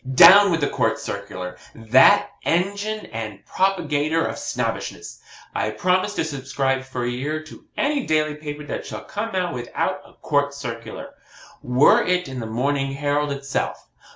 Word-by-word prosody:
Down 195 +7 +9
with 165 -3 0
the 145 - +2
COURT - - 0
CIRCULAR 90 0 -6 0.2
that 115 +3 +5
engine 200 +5 -1
and 110 -3 -6
propagator 160 -4 +1
of - - -4
Snobbishness! - - -4 0.3
I - - -1
promise 185 - 0
to - - 0
subscribe 135 -3 -1
for 130 -2 -5
a - - -1
year 145 +6 -3
to 155 - -14
any 285 -2 0
daily 155 -1 +1
paper 150 0 -7
that 145 - -5
shall - - -7
come 210 0 -4
out 180 -2 0
without 120 -1 -2
a - - -18
COURT 145 0 +1
CIRCULAR 115 -5 -7 0.5
were 125 +3 +5
it 180 0 +1
the 135 - -8
MORNING 135 +4 -1
HERALD 145 +1 0
itself. 140 0 -3
145 Hz, 155 wpm, -22 LUFS, 130-175 Hz, 0.5 s, Down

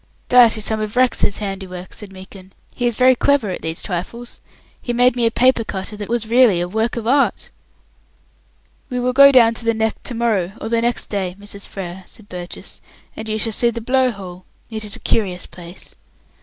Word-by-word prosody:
"That 240 -3 +6
is 215 - -3
some 220 -1 0
of 215 +1 -4
Rex's 250 -5 +2
handiwork," 190 -3 -6
said 210 -2 -8
Meekin. 190 0 -13 0.2
"He 245 - -1
is 240 - 0
very 255 +2 +5
clever 255 -5 +1
at - - -5
these 160 +1 -5
trifles. 225 +6 -6 0.4
He 240 - -3
made 245 +1 +3
me 235 -2 +2
a - - +3
paper 250 0 +3
cutter 195 0 -5
that 205 0 -7
was 235 -1 -1
really 235 -5 +4
a 175 - -1
work 220 +5 -1
of 235 -2 -4
art." 275 +4 +1 1.4
"We 250 -2 -2
will 250 +1 0
go 280 +1 +8
down 235 -4 +6
to 230 - -8
the 230 0 +1
Neck 220 0 -1
to 245 - -4
morrow 210 -6 0
or 220 - -5
next 235 +1 0
day, 190 -3 -2
Mrs. 200 0 -9
Frere," 185 -1 -7
said 215 -3 -11
Burgess, 180 -1 -9 0.3
"and 220 0 -7
you 215 - -1
shall 225 +1 -2
see 235 +3 +3
the 235 0 -4
Blow 255 +2 +2
hole. 185 -5 -9 0.3
It 220 -1 -4
is 205 -1 -5
a - - -11
curious 185 -5 0
place." 175 +2 -12
220 Hz, 205 wpm, -19 LUFS, 190-240 Hz, 1.4 s, go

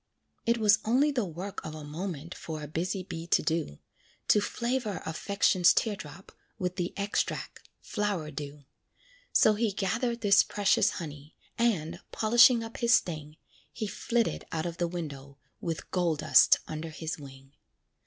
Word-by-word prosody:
It 235 0 +3
was 210 -2 +5
only 265 +7 +3
the 245 -6 0
work 180 +4 -6
of 155 0 -6
a 155 - -8
moment 165 +1 -5
For 155 -2 -7
a - - -5
busy 180 +5 -2
bee 170 -3 -7
to - - +3
do, 160 - -1 0.5
To 210 - +5
flavor 235 -3 -2
affections 180 +2 +3
tear 220 -3 +1
drop 175 +2 -11 0.3
With 180 0 -3
the 175 -1 -1
extract, 200 +1 -3
"flower 200 -7 -2
dew." 145 0 -7 0.7
So 215 - +5
he 215 0 0
gathered 230 +5 -1
this 200 -2 +6
precious 205 -2 +2
honey, 150 -2 -8 0.2
And, 205 -10 0
polishing 235 +2 +5
up 225 0 -8
his 235 +1 +5
sting, 155 -3 -3 0.3
He 220 - -4
flitted 230 +3 -1
out 160 0 -2
of 170 -1 -4
the 175 - 0
window, 140 -5 -7 0.2
With 165 -2 -5
gold 170 -4 0
dust - - +6
under 160 +1 -5
his 160 0 -5
wing. 135 -1 -13
180 Hz, 155 wpm, -29 LUFS, 155-210 Hz, 0.7 s, this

